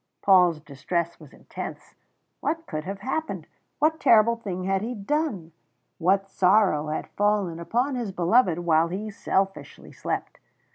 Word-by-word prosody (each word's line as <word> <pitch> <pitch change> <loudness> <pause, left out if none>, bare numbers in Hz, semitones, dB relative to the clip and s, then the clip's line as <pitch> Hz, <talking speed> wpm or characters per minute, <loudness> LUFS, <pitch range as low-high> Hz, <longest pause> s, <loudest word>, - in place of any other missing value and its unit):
Paul's 180 -5 +5
distress 165 +4 -3
was 150 -4 -14
intense - - -9 0.5
what 325 +1 -2
could 155 0 -5
have 195 +1 -6
happened? 315 +5 -3 0.3
What 315 +1 +2
terrible 230 +1 +5
thing 190 -6 -5
had 195 +1 0
he 240 +3 -4
done? 210 - -2 0.5
What 195 +3 +2
sorrow 190 -5 +3
had 155 - -3
fallen 205 -5 0
upon 245 +11 0
his 240 -5 -3
beloved 180 +1 +3
while 165 -1 +2
he 205 +5 -5
selfishly 195 -1 -2
slept? - - -4
195 Hz, 140 wpm, -25 LUFS, 170-230 Hz, 0.5 s, Paul's